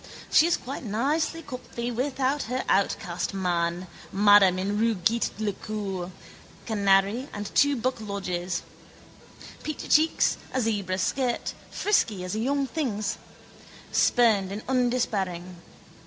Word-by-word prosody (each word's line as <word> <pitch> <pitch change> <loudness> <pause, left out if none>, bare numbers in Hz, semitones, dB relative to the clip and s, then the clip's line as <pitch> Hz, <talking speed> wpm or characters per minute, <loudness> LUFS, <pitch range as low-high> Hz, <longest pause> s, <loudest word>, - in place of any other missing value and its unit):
She 315 - +6
is 345 - +2
quite 270 +2 -7
nicey 290 +9 -1
comfy 245 -3 -5
without 265 +3 0
her 255 +1 -1
outcast 195 -1 0
man, 175 -1 -1 0.3
madame 205 -2 +6
in 200 +3 -1
rue 225 0 +2
Gît 220 +6 +1
le 215 -1 -1
Cœur, 195 -4 -4 0.6
canary 200 +4 +2
and 205 0 -6
two 285 0 +4
buck 255 -1 -2
lodgers. 185 -4 -3 1.0
Peachy 310 - -5
cheeks, 315 +2 +3 0.2
a - - +2
zebra 205 -6 -1
skirt, 245 +5 -1 0.2
frisky 220 - +1
as 180 - -4
a 215 - -2
young 275 +4 +1
thing's. 245 -8 -2 0.7
Spurned 215 -6 +3
and 205 +2 -5
undespairing. 205 -9 -1
215 Hz, 125 wpm, -26 LUFS, 195-255 Hz, 1.0 s, She